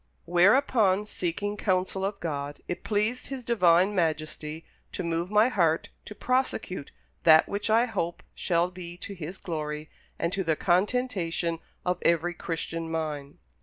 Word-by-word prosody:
"Whereupon, 200 Hz, -, +4 dB
seeking 205 Hz, +1 st, -3 dB
counsel 190 Hz, -1 st, 0 dB
of 200 Hz, +1 st, -2 dB
God, 145 Hz, -3 st, -4 dB
it 175 Hz, -, -4 dB
pleased 215 Hz, +4 st, 0 dB
His 265 Hz, -2 st, -6 dB
Divine 185 Hz, -4 st, +4 dB
Majesty 155 Hz, -2 st, -2 dB, 0.3 s
to 185 Hz, -, -3 dB
move 170 Hz, +1 st, -1 dB
my 210 Hz, +2 st, +5 dB
heart 170 Hz, -9 st, +1 dB, 0.2 s
to 210 Hz, -, -9 dB
prosecute 235 Hz, -, -1 dB, 0.3 s
that 160 Hz, -1 st, +7 dB
which 205 Hz, +2 st, -3 dB
I 225 Hz, +2 st, +5 dB
hope 175 Hz, -8 st, -3 dB
shall 175 Hz, 0 st, +1 dB
be 175 Hz, -1 st, -8 dB
to 200 Hz, -, -6 dB
His 175 Hz, 0 st, -6 dB
glory 155 Hz, -2 st, -4 dB, 0.3 s
and 170 Hz, -, -1 dB
to 195 Hz, -, 0 dB
the 160 Hz, -2 st, +1 dB
contentation 180 Hz, -3 st, 0 dB, 0.3 s
of 180 Hz, 0 st, 0 dB
every 170 Hz, +1 st, +2 dB
Christian 165 Hz, -1 st, -4 dB
mind." 150 Hz, -3 st, -4 dB
175 Hz, 145 wpm, -27 LUFS, 165-205 Hz, 0.3 s, that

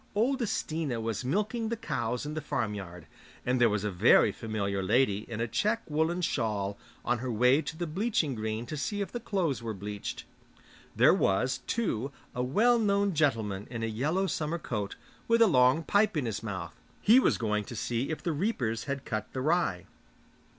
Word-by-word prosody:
Old 255 Hz, +5 st, +1 dB
Stina 155 Hz, -7 st, -2 dB
was 115 Hz, 0 st, -3 dB
milking 215 Hz, -, -1 dB
the 235 Hz, -, -2 dB
cows 125 Hz, -, -2 dB
in 150 Hz, -, -4 dB
the 155 Hz, -, -3 dB
farmyard, 100 Hz, -, -4 dB, 0.4 s
and 125 Hz, 0 st, +1 dB
there 120 Hz, -, +6 dB
was 105 Hz, -1 st, -1 dB
a 105 Hz, -, -1 dB
very 90 Hz, -, +5 dB
familiar 100 Hz, -3 st, -2 dB
lady 105 Hz, +1 st, +2 dB
in 115 Hz, -2 st, -5 dB
a 115 Hz, -, 0 dB
check 215 Hz, -, 0 dB
woollen 160 Hz, +4 st, 0 dB
shawl 105 Hz, -9 st, -1 dB, 0.3 s
on 120 Hz, -1 st, +1 dB
her 125 Hz, +1 st, -3 dB
way 125 Hz, +6 st, +4 dB
to 160 Hz, -, -6 dB
the 175 Hz, -, -2 dB
bleaching 170 Hz, -, 0 dB
green 110 Hz, 0 st, -3 dB
to 155 Hz, -, -5 dB
see 205 Hz, +8 st, -2 dB
if 195 Hz, -, -3 dB
the 240 Hz, -, -4 dB
clothes 185 Hz, -, -1 dB
were 115 Hz, -2 st, -4 dB
bleached. 100 Hz, +1 st, -5 dB, 0.7 s
There -, -, +6 dB
was, 125 Hz, +7 st, +1 dB
too, 140 Hz, -, -1 dB, 0.2 s
a 125 Hz, -, -2 dB
well 220 Hz, -, +3 dB
known 200 Hz, -2 st, +2 dB
gentleman 110 Hz, -10 st, 0 dB
in 120 Hz, -2 st, -4 dB
a -, -, +1 dB
yellow 145 Hz, -, 0 dB
summer 160 Hz, -2 st, -2 dB
coat, 105 Hz, -10 st, -4 dB, 0.3 s
with 230 Hz, 0 st, +4 dB
a 230 Hz, -, +8 dB
long 130 Hz, -, +4 dB
pipe 205 Hz, -1 st, +2 dB
in 140 Hz, -, 0 dB
his 110 Hz, -3 st, -3 dB
mouth; 95 Hz, -6 st, -5 dB, 0.3 s
he 230 Hz, +5 st, +6 dB
was -, -, +3 dB
going 105 Hz, -2 st, 0 dB
to 120 Hz, -, -8 dB
see 120 Hz, +4 st, -2 dB
if 160 Hz, -, -4 dB
the 170 Hz, -, 0 dB
reapers 140 Hz, -, -1 dB
had 140 Hz, -1 st, -4 dB
cut 110 Hz, -1 st, -3 dB
the 130 Hz, -, -2 dB
rye. 155 Hz, -, +1 dB
130 Hz, 190 wpm, -29 LUFS, 110-175 Hz, 0.7 s, a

